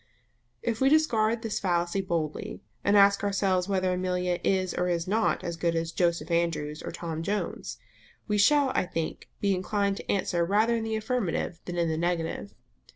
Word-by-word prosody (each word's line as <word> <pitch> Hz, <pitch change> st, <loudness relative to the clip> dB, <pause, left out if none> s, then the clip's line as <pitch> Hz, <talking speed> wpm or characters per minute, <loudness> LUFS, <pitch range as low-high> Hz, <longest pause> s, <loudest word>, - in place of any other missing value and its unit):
If 230 Hz, 0 st, -2 dB
we 265 Hz, -, +5 dB
discard 230 Hz, -7 st, +2 dB
this 225 Hz, -2 st, -2 dB
fallacy 175 Hz, 0 st, 0 dB
boldly, 165 Hz, -5 st, -3 dB, 0.2 s
and 205 Hz, -, +4 dB
ask 200 Hz, 0 st, +5 dB
ourselves 195 Hz, -2 st, +1 dB
whether 185 Hz, -2 st, +1 dB
Amelia 180 Hz, -1 st, -1 dB
is 185 Hz, -1 st, +1 dB
or 180 Hz, -, 0 dB
is 170 Hz, -1 st, -1 dB
not 220 Hz, +4 st, +1 dB
as 170 Hz, -1 st, -4 dB
good 170 Hz, 0 st, 0 dB
as 165 Hz, 0 st, -1 dB
Joseph 170 Hz, 0 st, 0 dB
Andrews 165 Hz, -3 st, 0 dB
or -, -, -5 dB
Tom 165 Hz, -2 st, -5 dB
Jones, 205 Hz, +5 st, -3 dB, 0.5 s
we 210 Hz, -1 st, +1 dB
shall 285 Hz, +6 st, +5 dB
I -, -, 0 dB
think 165 Hz, -3 st, -4 dB
be 200 Hz, -1 st, +2 dB
inclined 200 Hz, +2 st, 0 dB
to -, -, -4 dB
answer 180 Hz, -3 st, +1 dB
rather 215 Hz, +6 st, +2 dB
in 225 Hz, -1 st, -2 dB
the 220 Hz, 0 st, -1 dB
affirmative 220 Hz, -7 st, -2 dB
than 175 Hz, -1 st, -5 dB
in 170 Hz, -1 st, +2 dB
the 160 Hz, -1 st, -1 dB
negative. 170 Hz, +2 st, -2 dB
185 Hz, 180 wpm, -28 LUFS, 170-210 Hz, 0.5 s, we